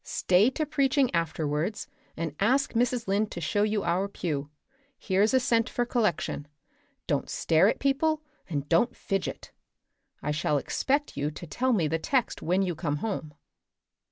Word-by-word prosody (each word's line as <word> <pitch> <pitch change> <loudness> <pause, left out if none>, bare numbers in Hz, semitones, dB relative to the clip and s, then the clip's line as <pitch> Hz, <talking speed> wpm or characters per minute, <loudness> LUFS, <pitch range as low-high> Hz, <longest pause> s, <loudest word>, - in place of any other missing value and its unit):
Stay 185 +6 +3
to 305 +4 -2
preaching 275 -3 +2
afterwards 160 +2 -1 0.3
and 160 -2 -3
ask 260 +7 +2
Mrs. 240 -1 +1
Lynde 205 +2 +1
to - - -6
show 190 +5 0
you 210 -1 +1
our 175 +3 +1
pew. 150 -7 -3 0.5
Here's 200 +2 +2
a 260 - +4
cent 230 -2 +2
for 245 - -1
collection. 215 - -1 0.6
Don't - - -1
stare 165 +4 +3
at - - +1
people 305 +3 +1 0.3
and 145 -3 -2
don't 205 +10 +2
fidget. 195 -1 -3 0.7
I 150 - 0
shall 150 0 +1
expect 280 - -1
you 145 +1 -1
to 155 +3 -9
tell 255 +10 0
me 180 -10 +2
the 165 +2 -1
text 255 - 0
when 180 +4 +1
you 180 -2 -1
come 150 -2 -2
home." 155 -4 -4
195 Hz, 160 wpm, -28 LUFS, 160-245 Hz, 0.7 s, a